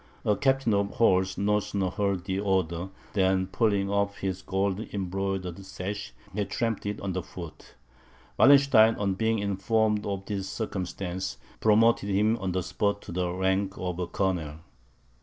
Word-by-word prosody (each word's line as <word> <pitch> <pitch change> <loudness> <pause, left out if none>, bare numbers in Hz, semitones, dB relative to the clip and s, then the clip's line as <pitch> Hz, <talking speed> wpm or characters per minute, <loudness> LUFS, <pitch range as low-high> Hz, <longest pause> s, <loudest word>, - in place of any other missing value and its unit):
A 105 - +3
captain 135 -2 +2
of 100 0 0
horse 95 -4 +3
no 105 +1 +2
sooner 95 -2 -2
heard 100 -3 -1
the 95 0 -1
order, 95 -3 0 0.2
than 95 -2 +2
pulling 100 0 +1
off 100 0 0
his 95 -1 -3
gold 95 0 -1
embroidered 95 -1 -3
sash, 95 -4 -5 0.2
he 105 +1 0
trampled 115 +1 -2
it - - -11
under 95 -2 -2
foot; 85 -2 -10 0.6
Wallenstein, 135 -6 +7
on 100 -2 0
being 110 +3 +1
informed 105 +2 +1
of 100 -1 -3
the 100 -2 -2
circumstance, 95 -2 -4 0.2
promoted 110 -1 +4
him 105 +3 +3
on 95 -3 -2
the 90 0 -1
spot 100 +3 -1
to - - -9
the 90 0 -1
rank 95 +1 0
of 90 -1 -3
Colonel. 80 -6 -1
95 Hz, 150 wpm, -27 LUFS, 95-105 Hz, 0.6 s, Wallenstein